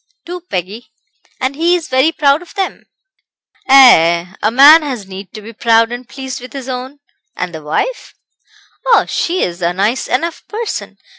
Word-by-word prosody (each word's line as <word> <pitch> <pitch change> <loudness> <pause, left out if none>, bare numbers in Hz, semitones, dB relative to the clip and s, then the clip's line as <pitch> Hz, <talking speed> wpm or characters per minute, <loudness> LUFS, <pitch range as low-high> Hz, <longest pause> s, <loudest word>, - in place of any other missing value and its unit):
"Two, 355 +1 -7
Peggy; 195 +5 -5 0.5
and 260 +2 -2
he 340 +4 +2
is 335 -3 -4
very 260 +5 +2
proud 290 -1 +2
of 355 - -15
them." 385 -1 -4 0.8
"Ay, 170 -11 +6
ay; - - -18
a 215 - +2
man 285 +7 +7
has 255 -9 -5
need 190 -1 -10
to 215 -2 -9
be 225 +2 -10
proud 230 +1 +2
and 245 0 -7
pleased 265 -2 -7
with 250 - -11
his 270 -2 -7
own. 260 +2 -6 0.4
And 180 -1 -4
the 160 - -7
wife?" 160 - -3 0.7
"Oh, - - +4
she's 185 - -2
a 170 0 0
nice 210 +7 -1
enough 330 +7 -2
person. 445 +1 -5
255 Hz, 170 wpm, -15 LUFS, 200-305 Hz, 0.8 s, man